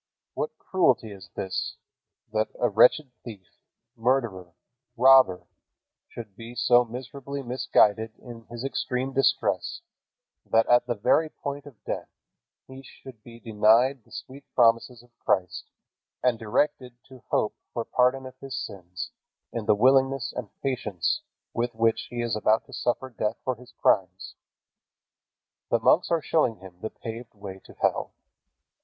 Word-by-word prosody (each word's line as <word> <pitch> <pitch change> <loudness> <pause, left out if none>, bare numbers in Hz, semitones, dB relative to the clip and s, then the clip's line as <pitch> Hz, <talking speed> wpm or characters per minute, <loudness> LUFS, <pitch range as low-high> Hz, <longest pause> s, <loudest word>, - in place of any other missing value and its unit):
What 470 - -4
cruelty 130 - +1
is 95 -3 -11
this, 95 -1 -3 0.6
that 110 0 +1
a 120 - +3
wretched 125 +6 +5
thief, 105 -6 -9 0.5
murderer, 115 -8 -1 0.4
robber 130 -7 +6 0.6
should 110 -4 -10
be 115 +2 -10
so 120 0 +5
miserably 135 +3 -7
misguided 110 -3 +2
in 115 -2 -12
his 120 +1 -7
extreme 135 -1 -2
distress, 135 0 +1 0.6
that 115 0 +3
at 120 0 +4
the 120 - 0
very 155 +9 +2
point 140 -1 -6
of 130 -7 -15
death - - -4 0.6
he 130 0 -10
should 130 -3 -14
be 115 +1 -13
denied 115 +3 +3
the - - -27
sweet 135 +2 -9
promises 115 0 +3
of 120 -1 -25
Christ, 90 -2 0 0.6
and 125 -3 +2
directed 125 +2 -1
to 130 -2 -14
hope 105 - +1 0.2
for 115 - -3
pardon 130 +1 +2
of 130 0 -9
his 135 -1 -6
sins 90 -8 -6 0.4
in 115 -3 -4
the 105 - +5
willingness 135 +3 +3
and 120 -5 -5
patience 125 - -1 0.3
with 120 0 -2
which 115 0 +1
he 120 -1 -3
is 115 -3 -1
about 110 +1 +2
to 135 - -15
suffer 125 +2 -1
death 110 -1 -2
for 130 - 0
his 125 +1 -15
crimes? 95 0 +1 1.4
The - - +3
monks 160 +9 +4
are 165 -3 +1
showing 140 -8 +2
him 95 -2 -14
the 110 - -3
paved 115 0 -8
way 100 -2 -8
to - - -14
hell. - - 0
120 Hz, 145 wpm, -26 LUFS, 110-130 Hz, 1.4 s, robber